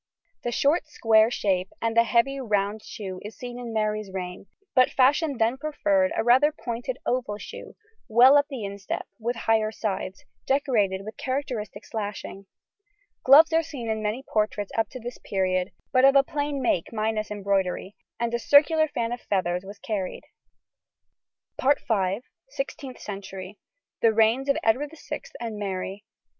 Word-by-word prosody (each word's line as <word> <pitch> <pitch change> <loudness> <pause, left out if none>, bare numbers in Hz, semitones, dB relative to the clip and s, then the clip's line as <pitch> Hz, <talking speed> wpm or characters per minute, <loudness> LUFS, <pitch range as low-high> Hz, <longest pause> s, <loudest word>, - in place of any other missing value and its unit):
The 240 - -2
short 290 +7 +2
square 225 -6 +4
shape 190 -6 0
and 230 0 -1
the 230 0 +5
heavy 250 +4 +2
round 210 -3 0
shoe 190 -4 -7
is 210 +2 -9
seen 245 -1 -7
in 240 -2 -6
Mary's 215 -2 -1
reign, 180 0 -6 0.3
but 255 -1 +5
fashion 280 +2 +3
then 230 +3 +2
preferred 295 -1 +1
a - - +1
rather 260 +6 +5
pointed 245 -2 -5
oval 240 -5 -1
shoe, - - -10 0.3
well 250 +4 +7
up 285 0 +4
the 255 -7 -5
instep 200 -1 -5
with 235 +2 -2
higher 225 -1 +1
sides, 195 -3 -4 0.2
decorated 220 -9 +1
with 215 - -8
characteristic 250 -7 -4
slashing. 205 -2 -6 0.8
Gloves 310 +5 +8
are 325 - +5
seen 250 -8 -5
in 220 0 -2
many 215 +5 -2
portraits 210 -4 -1
up 225 -2 +1
to 255 - -8
this 245 +1 -7
period, 185 -1 0 0.2
but 255 0 +4
of 275 +1 +7
a 275 - +7
plain 285 -1 -2
make 180 -8 0
minus 215 -1 -1
embroidery, 195 -1 -1 0.2
and 235 0 -1
a 235 - +1
circular 310 +5 +5
fan 235 -5 -2
of 245 - -4
feathers 180 -2 -1
was 200 +1 -10
carried. 200 -4 -4 2.3
SIXTEENTH 275 - -5
CENTURY. 195 -1 -8 0.4
THE 230 - +5
REIGNS 225 +5 +3
OF 280 - +3
EDWARD 280 +7 +1
VI - - -6 0.2
AND 225 -3 -5
MARY. 195 +1 -4
225 Hz, 155 wpm, -26 LUFS, 205-265 Hz, 2.3 s, Gloves